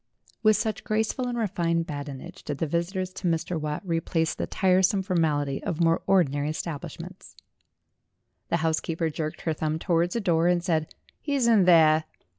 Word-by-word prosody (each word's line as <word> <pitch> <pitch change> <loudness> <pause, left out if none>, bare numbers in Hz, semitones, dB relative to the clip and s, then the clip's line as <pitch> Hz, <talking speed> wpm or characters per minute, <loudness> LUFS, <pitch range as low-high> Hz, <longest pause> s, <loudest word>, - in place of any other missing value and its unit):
With 215 -1 +5
such 220 -1 -2
graceful 220 +4 -1
and 240 -1 -3
refined 170 -6 0
badinage 145 -3 -7
did 145 - -5
the 165 - -1
visitors 180 +4 -2
to 185 - -4
Mr. 165 0 -1
Watt 150 +3 -3
replace 165 -1 0
the - - -4
tiresome 190 +1 +2
formality 150 -6 0
of 160 - -3
more 165 -1 +3
ordinary 145 -6 +2
establishments. 155 -1 -7 1.1
The - - +2
housekeeper 160 0 -1
jerked 155 0 -4
her 160 - -1
thumb 155 0 -2
towards 170 +2 0
a - - +1
door, 170 -5 +2
and 175 -1 +2
said, 160 -4 -1 0.3
"He's 280 -4 0
in 220 -5 +5
there." 160 -3 +5
170 Hz, 160 wpm, -26 LUFS, 155-185 Hz, 1.1 s, With